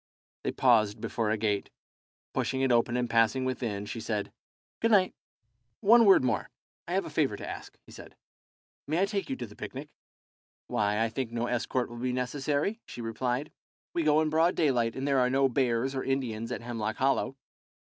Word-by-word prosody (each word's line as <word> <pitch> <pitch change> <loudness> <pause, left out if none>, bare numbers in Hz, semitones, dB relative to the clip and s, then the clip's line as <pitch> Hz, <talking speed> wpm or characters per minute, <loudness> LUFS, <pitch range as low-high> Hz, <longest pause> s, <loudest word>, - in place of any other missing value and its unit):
They - - -1
paused 110 -4 +3
before 110 0 -2
a 110 - +1
gate. 105 -2 -1 0.6
Pushing 130 0 -1
it 135 -1 +2
open 120 0 +3
and 125 -1 0
passing 115 +2 +2
within, 115 -6 -2
she 115 - -5
said, 105 -2 -3 0.5
"Good 230 - +2
night." 195 -4 +4 0.7
"One 230 +3 +6
word 195 -9 +7
more. 125 - 0 0.4
I - - -3
have - - +1
a - - -6
favour - - +1
to - - -7
ask," - - -8
he - - -16
said. - - -12 0.7
"May 155 +4 0
I 195 - +4
take 200 -1 -3
you 135 - -1
to 125 - -5
the 105 -2 -14
picnic?" - - -7 0.8
"Why, 105 +1 0
I 115 - +2
think 115 +1 -3
no 120 0 -1
escort 120 +1 -1
will 120 - -10
be 125 +1 -1
necessary," 145 - -1
she - - -9
replied; 125 +5 -2 0.4
"we 170 - 0
go 155 0 +4
in 155 -1 0
broad 165 +3 +3
daylight; 125 -7 +1
and 135 +1 -3
there 140 -2 +3
are 125 0 +3
no 135 +1 +3
bears 130 0 0
or 130 - -2
Indians 120 -4 -2
at 125 - -3
Hemlock 115 -2 -3
Hollow." 135 0 +1
125 Hz, 195 wpm, -29 LUFS, 115-140 Hz, 0.8 s, word